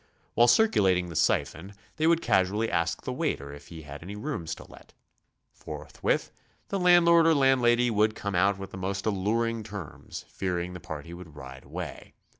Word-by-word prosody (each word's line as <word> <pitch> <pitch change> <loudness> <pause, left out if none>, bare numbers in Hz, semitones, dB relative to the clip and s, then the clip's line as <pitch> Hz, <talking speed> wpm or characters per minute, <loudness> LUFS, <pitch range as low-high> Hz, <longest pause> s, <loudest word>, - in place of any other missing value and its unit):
While 120 - +5
circulating 95 - +3
the 85 - -8
siphon, 90 +6 0 0.2
they 160 0 +2
would 170 0 +3
casually 105 +4 +1
ask 85 0 -1
the 130 - -3
waiter 100 - -2
if 70 0 -12
he 80 -2 -10
had 75 0 -9
any 95 +5 -8
rooms 105 - -4
to - - -12
let. - - -16 0.6
Forthwith - - -3 0.4
the 200 - -1
landlord 170 -2 +6
or 165 - +5
landlady 125 -3 +3
would 110 0 +2
come 100 0 -4
cut 95 +2 +3
with 95 0 -8
the - - -8
most 95 +1 -3
alluring 110 +3 0
terms, 100 -7 -8
fearing 90 -1 -3
the 90 - -7
party 80 +1 -8
would 85 -4 -11
ride 65 -1 -10
away. - - -8
100 Hz, 175 wpm, -27 LUFS, 85-120 Hz, 0.6 s, landlord